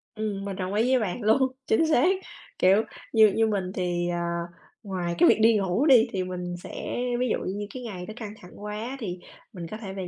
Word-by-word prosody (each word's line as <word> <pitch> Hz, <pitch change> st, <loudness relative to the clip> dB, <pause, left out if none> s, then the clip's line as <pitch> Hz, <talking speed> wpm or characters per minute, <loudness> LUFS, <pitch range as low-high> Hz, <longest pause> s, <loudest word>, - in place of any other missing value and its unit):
Ừm, 210 Hz, -2 st, -3 dB
mình 200 Hz, -1 st, -4 dB
đồng 185 Hz, 0 st, -3 dB
ý 225 Hz, +4 st, +2 dB
với 260 Hz, -, +4 dB
bạn 215 Hz, +1 st, -3 dB
luôn, 240 Hz, +5 st, +3 dB, 0.2 s
chính 320 Hz, +9 st, +3 dB
xác. 305 Hz, -1 st, +4 dB, 0.5 s
Kiểu, 195 Hz, +4 st, +5 dB, 0.3 s
như 220 Hz, -2 st, +7 dB
như 225 Hz, 0 st, +3 dB
mình 195 Hz, -4 st, -1 dB
thì, 175 Hz, -2 st, -1 dB
ờ, 175 Hz, 0 st, -1 dB, 0.6 s
ngoài 180 Hz, -4 st, -3 dB
cái -, -, +6 dB
việc -, -, +4 dB
đi 225 Hz, 0 st, +6 dB
ngủ 195 Hz, +6 st, +1 dB
đi 255 Hz, -5 st, +6 dB
thì 190 Hz, -1 st, -1 dB
mình 180 Hz, -1 st, -5 dB
sẽ -, -, -5 dB, 0.2 s
ví 250 Hz, -, +1 dB
dụ -, -, +1 dB
như 205 Hz, +2 st, -3 dB
cái 255 Hz, -, -7 dB
ngày 190 Hz, -6 st, -6 dB
đó 215 Hz, -, -8 dB
căng 215 Hz, -3 st, -6 dB
thẳng 180 Hz, -, -13 dB
quá 215 Hz, +5 st, -5 dB
thì 185 Hz, -7 st, -5 dB, 0.3 s
mình 175 Hz, -4 st, -6 dB
có 215 Hz, -, -4 dB
thể 200 Hz, -4 st, -7 dB
về 190 Hz, -2 st, -5 dB
205 Hz, 225 wpm, -26 LUFS, 185-225 Hz, 0.6 s, như